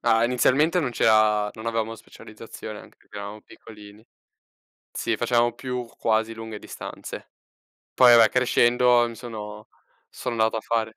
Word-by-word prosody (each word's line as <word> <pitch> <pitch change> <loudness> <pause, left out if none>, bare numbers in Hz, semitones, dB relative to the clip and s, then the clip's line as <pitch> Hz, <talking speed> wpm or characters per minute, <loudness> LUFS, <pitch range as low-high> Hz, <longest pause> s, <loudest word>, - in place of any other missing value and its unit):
ah, 115 -1 +3
inizialmente 135 +8 +2
non 135 -6 -2
c'era 110 -2 +3
non 110 +1 -10
avevamo 115 -1 -2
specializzazione, 110 -1 -11
anche - - -16
perché - - -16
eravamo 100 +1 -8
piccolini. 105 -1 -15 0.9
Sì, - - -2
facevamo 120 -1 +1
più 125 -2 -5
quasi 110 0 0
lunghe 110 -1 -8
distanze. - - -9 0.6
Poi 125 -2 +7
vabbè, 115 -1 +7
crescendo, 125 -1 +3
mi 115 - -8
sono 105 -3 -9 0.5
sono 120 - -4
andato 110 0 +1
a - - -2
fare 110 -1 -2
115 Hz, 140 wpm, -24 LUFS, 110-120 Hz, 0.9 s, Poi